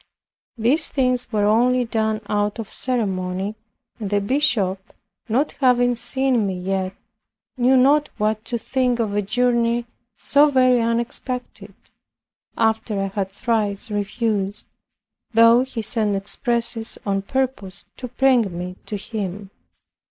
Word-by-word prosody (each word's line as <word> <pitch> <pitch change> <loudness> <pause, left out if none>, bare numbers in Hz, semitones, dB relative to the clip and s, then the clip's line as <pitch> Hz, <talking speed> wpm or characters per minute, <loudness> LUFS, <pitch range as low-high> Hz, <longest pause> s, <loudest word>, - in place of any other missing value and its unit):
These 260 +8 +2
things 255 -2 0
were 210 -2 +1
only 245 +4 +3
done 220 -1 -1
out 205 +1 0
of 225 -2 -7
ceremony; 195 -5 -2 0.5
and 210 -3 -4
the 205 0 +2
bishop, 200 -5 0 0.4
not 265 +7 +1
having 245 -1 +4
seen 255 -2 +1
me 185 -2 -3
yet, 190 +1 -2 0.6
knew 255 +1 +3
not 290 +3 +4
what 215 0 0
to 235 +1 -2
think 250 +1 0
of 220 -4 -1
a 205 - +1
journey 235 +2 +1 0.3
so 290 +1 +4
very 255 -3 +4
unexpected, 235 +2 -3 0.8
after 220 -2 0
I 195 - -1
had 195 -1 -3
thrice 210 -1 -2
refused, 205 0 -2 0.7
though 230 +1 +7
he 255 -3 -4
sent 215 -2 0
expresses 230 +3 -1
on 195 -1 0
purpose 245 -4 -3
to 250 - -6
bring 245 -7 +2
me 180 +1 -6
to 210 - -4
him. 200 -2 -6
225 Hz, 130 wpm, -21 LUFS, 200-250 Hz, 0.8 s, though